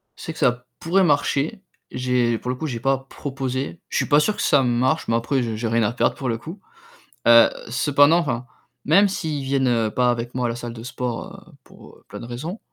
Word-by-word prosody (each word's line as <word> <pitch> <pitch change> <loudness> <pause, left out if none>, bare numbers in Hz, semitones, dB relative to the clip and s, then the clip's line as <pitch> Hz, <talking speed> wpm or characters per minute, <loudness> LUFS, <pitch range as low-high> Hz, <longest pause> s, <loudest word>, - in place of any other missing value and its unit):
C'est - - -7
que - - -12
ça 125 0 +1
pourrait 185 +4 +2
marcher. 145 +4 +1 0.3
J'ai, 125 -2 0
pour 125 - -6
le 125 - -1
coup, 155 +5 -4
j'ai 120 -4 -4
pas 135 +2 +1
proposé. 135 +1 -4
Je - - 0
pas 145 0 +4
sûr 210 +7 +1
que - - -4
ça 140 -3 +3
marche, 125 +5 +1
mais 115 - +1
après, 125 +3 0
j'ai 110 -2 -3
j'ai 115 0 -2
rien 115 0 +1
à 105 - +1
perdre - - +1
pour 130 -3 -4
le 115 - -1
coup, 165 - -9 0.7
heu, 115 0 +8 0.2
cependant, 145 +6 +4
enfin, 125 -6 -2 0.4
même 195 +7 +5
s'ils 155 -7 -3
viennent 125 -5 +1
pas 125 -1 +2
avec 120 +1 -4
moi 125 -1 -1
à - - 0
la 115 - -3
salle 120 -1 -6
de 115 -1 -10
sport, 125 +6 -5 0.2
heu, - - -19
pour - - -16
heu, - - -26
plein 105 +1 -8
de - - -8
raisons, 155 - -6
125 Hz, 225 wpm, -22 LUFS, 120-145 Hz, 0.7 s, heu